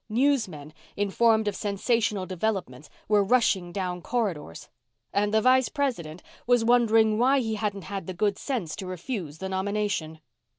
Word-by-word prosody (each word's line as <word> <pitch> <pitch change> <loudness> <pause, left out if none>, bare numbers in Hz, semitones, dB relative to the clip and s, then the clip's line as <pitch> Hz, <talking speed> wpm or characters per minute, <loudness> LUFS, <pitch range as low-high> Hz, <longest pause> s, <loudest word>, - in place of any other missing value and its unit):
Newsmen, 215 - 0 0.2
informed 220 +2 +2
of 205 - -1
sensational 210 -1 0
developments, 185 - -3 0.2
were 210 -1 +4
rushing 195 -5 +2
down 180 -1 -3
corridors. 185 - -3 0.5
And 205 +1 +1
the 220 0 +3
Vice 255 +1 +4
President 205 - -3 0.2
was 245 -2 +3
wondering 225 -2 +4
why 265 +3 +4
he 225 -3 -2
hadn't 205 -3 -3
had 195 0 -6
the 185 - -5
good 205 +1 0
sense 225 - -3
to 190 -3 -6
refuse 180 - -5
the 190 +3 -5
nomination. 190 -4 -2
205 Hz, 145 wpm, -26 LUFS, 185-230 Hz, 0.5 s, were